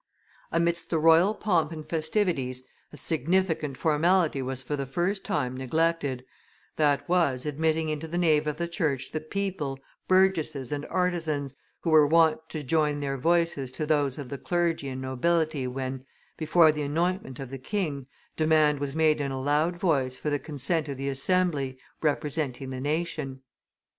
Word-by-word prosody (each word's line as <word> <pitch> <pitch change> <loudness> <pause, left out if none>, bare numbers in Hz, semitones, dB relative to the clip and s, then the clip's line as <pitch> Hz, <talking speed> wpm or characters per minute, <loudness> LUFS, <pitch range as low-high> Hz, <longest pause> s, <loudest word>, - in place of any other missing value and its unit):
Amidst 170 +1 0
the 165 - +1
royal 165 +6 +5
pomp 170 -7 +1
and 155 -2 -7
festivities, 160 -6 0 0.3
a 150 - -11
significant 160 -2 0
formality 160 0 +2
was 130 0 -4
for 145 +4 -2
the 140 -1 -4
first 175 +8 -1
time 125 0 -1
neglected; 140 -1 0 0.5
that 145 -2 +2
was, 165 -8 +1
admitting 160 +2 0
into 155 +1 -3
the 170 +2 -3
nave 155 -3 +3
of 150 - -2
the 170 - -2
church 150 -6 -2
the 155 - -2
people, 155 -5 -3 0.3
burgesses 165 -8 +2
and 145 0 -3
artisans, 165 -6 -1 0.3
who 165 - -1
were 155 -2 +7
wont 160 0 +3
to 155 -2 -5
join 150 +1 +1
their 140 -1 -2
voices 165 -4 +1
to 155 - -3
those 145 -4 +1
of 140 -4 -7
the 140 - -5
clergy 170 -5 0
and 130 0 -5
nobility 155 +1 0
when, 130 0 -4 0.3
before 160 0 +5
the 150 0 -4
anointment 165 - -1
of 135 -2 -7
the 135 - -6
king, 145 - -3 0.3
demand 155 -2 +3
was 140 0 -3
made 155 -1 +3
in 140 -1 -2
a 135 - -3
loud 150 +5 +1
voice 140 -8 0
for 150 - -3
the 145 - +1
consent 150 +2 -1
of 140 - -4
the 135 +1 -2
assembly, 140 -2 0 0.2
representing 145 -3 -1
the 130 0 -5
nation. 145 -3 -3
155 Hz, 165 wpm, -27 LUFS, 135-165 Hz, 0.5 s, were